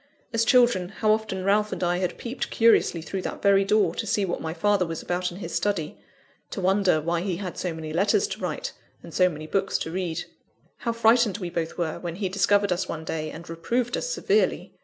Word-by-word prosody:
As 230 Hz, 0 st, +3 dB
children, 240 Hz, -9 st, +4 dB
how 215 Hz, +1 st, +1 dB
often 215 Hz, -4 st, -1 dB
Ralph 210 Hz, +2 st, +2 dB
and -, -, -3 dB
I 175 Hz, 0 st, +1 dB
had 180 Hz, -1 st, -2 dB
peeped 245 Hz, +1 st, -4 dB
curiously 225 Hz, -7 st, +3 dB
through 190 Hz, +4 st, -4 dB
that -, -, -6 dB
very 200 Hz, -1 st, +5 dB
door, 210 Hz, +2 st, +2 dB
to 225 Hz, -, -4 dB
see 200 Hz, 0 st, +1 dB
what 175 Hz, -, -3 dB
my 160 Hz, -, -3 dB
father 195 Hz, +3 st, +2 dB
was 165 Hz, -2 st, -4 dB
about 180 Hz, 0 st, -1 dB
in 175 Hz, -, -9 dB
his 170 Hz, -4 st, -6 dB
study, 170 Hz, -2 st, -1 dB, 0.5 s
to -, -, -5 dB
wonder 190 Hz, -2 st, +3 dB
why 170 Hz, +2 st, -1 dB
he 185 Hz, -1 st, -1 dB
had 185 Hz, -2 st, -5 dB
so 180 Hz, -, -2 dB
many 160 Hz, -1 st, -6 dB
letters 205 Hz, -, +3 dB
to -, -, -5 dB
write, -, -, -3 dB, 0.3 s
and -, -, -11 dB
so 185 Hz, 0 st, +4 dB
many 155 Hz, -2 st, -7 dB
books 195 Hz, +4 st, 0 dB
to 160 Hz, -, -4 dB
read. 170 Hz, -2 st, -2 dB, 0.5 s
How 235 Hz, -, -2 dB
frightened 230 Hz, -2 st, +3 dB
we 180 Hz, -4 st, -5 dB
both 165 Hz, -1 st, -3 dB
were, 165 Hz, -3 st, -2 dB
when 170 Hz, -2 st, -5 dB
he 190 Hz, 0 st, -2 dB
discovered 200 Hz, +1 st, +2 dB
us 180 Hz, +1 st, -1 dB
one 160 Hz, 0 st, -5 dB
day, 155 Hz, -1 st, -3 dB
and 165 Hz, +3 st, -9 dB
reproved 235 Hz, +9 st, -1 dB
us -, -, -2 dB
severely! 430 Hz, -3 st, +1 dB
190 Hz, 220 wpm, -25 LUFS, 170-210 Hz, 0.5 s, very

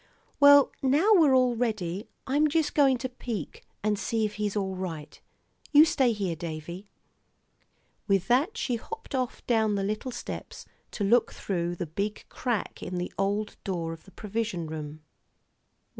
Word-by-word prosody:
"Well, 285 Hz, -1 st, +8 dB
now 290 Hz, +11 st, +3 dB
we're 310 Hz, -9 st, +6 dB
all 250 Hz, -2 st, +3 dB
ready. 210 Hz, -5 st, -2 dB, 0.2 s
I'm 290 Hz, +3 st, +3 dB
just 310 Hz, 0 st, +1 dB
going 275 Hz, -3 st, +4 dB
to 255 Hz, +2 st, -4 dB
peek 235 Hz, -, -6 dB, 0.2 s
and 210 Hz, -1 st, +1 dB
see 220 Hz, +2 st, 0 dB
if 210 Hz, -, -3 dB
he's 205 Hz, -1 st, -1 dB
all 190 Hz, -2 st, -1 dB
right. 165 Hz, -5 st, -6 dB, 0.5 s
You 295 Hz, +2 st, +9 dB
stay 265 Hz, -6 st, +2 dB
here, 195 Hz, -6 st, -2 dB
Davie." 170 Hz, +3 st, -7 dB, 1.2 s
With 195 Hz, -2 st, +2 dB
that 295 Hz, -, +2 dB
she 245 Hz, -, -1 dB
hopped 450 Hz, -, -9 dB
off 255 Hz, -2 st, -2 dB
down 220 Hz, -3 st, +2 dB
the 195 Hz, -, -1 dB
little 215 Hz, +5 st, -2 dB
steps -, -, -7 dB, 0.2 s
to 210 Hz, -, -4 dB
look 230 Hz, +4 st, +3 dB
through 175 Hz, -2 st, -2 dB
the 175 Hz, -, -3 dB
big 200 Hz, +7 st, -4 dB
crack 240 Hz, -6 st, -3 dB
in 180 Hz, -, -5 dB
the 180 Hz, 0 st, -4 dB
old 205 Hz, +2 st, -1 dB
door 170 Hz, -4 st, -3 dB
of 165 Hz, -, -13 dB
the 195 Hz, -, -16 dB
provision 210 Hz, -3 st, -3 dB
room. 155 Hz, -1 st, -7 dB
210 Hz, 160 wpm, -28 LUFS, 185-255 Hz, 1.2 s, You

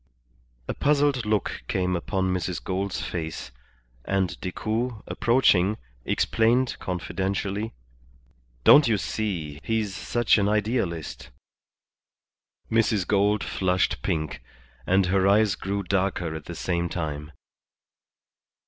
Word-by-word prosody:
A -, -, -1 dB
puzzled 145 Hz, -5 st, +2 dB
look 105 Hz, -1 st, 0 dB
came 90 Hz, -1 st, 0 dB
upon 95 Hz, +1 st, -1 dB
Mrs. 90 Hz, -1 st, -3 dB
Gould's 95 Hz, +1 st, -2 dB
face, 80 Hz, -7 st, -5 dB, 0.5 s
and 95 Hz, -3 st, 0 dB
Decoud, 110 Hz, +4 st, -2 dB
approaching, 105 Hz, -5 st, +3 dB, 0.3 s
explained 120 Hz, +3 st, +2 dB
confidentially 95 Hz, +3 st, -2 dB, 0.9 s
"Don't 145 Hz, -, +8 dB
you 110 Hz, -2 st, +3 dB
see, 85 Hz, -8 st, -3 dB
he's 110 Hz, -3 st, -1 dB
such 120 Hz, 0 st, +2 dB
an 100 Hz, 0 st, +2 dB
idealist." 105 Hz, -, -1 dB, 1.4 s
Mrs. 110 Hz, -4 st, +2 dB
Gould 105 Hz, +1 st, +2 dB
flushed 90 Hz, -9 st, 0 dB
pink, 75 Hz, -5 st, -2 dB, 0.5 s
and 95 Hz, +1 st, +4 dB
her 95 Hz, +1 st, +2 dB
eyes 105 Hz, 0 st, +4 dB
grew 100 Hz, +2 st, -3 dB
darker 90 Hz, -3 st, 0 dB
at 80 Hz, -2 st, -7 dB
the 85 Hz, -, -7 dB
same 85 Hz, +1 st, -1 dB
time. 75 Hz, -3 st, -4 dB
95 Hz, 105 wpm, -26 LUFS, 90-110 Hz, 1.4 s, Don't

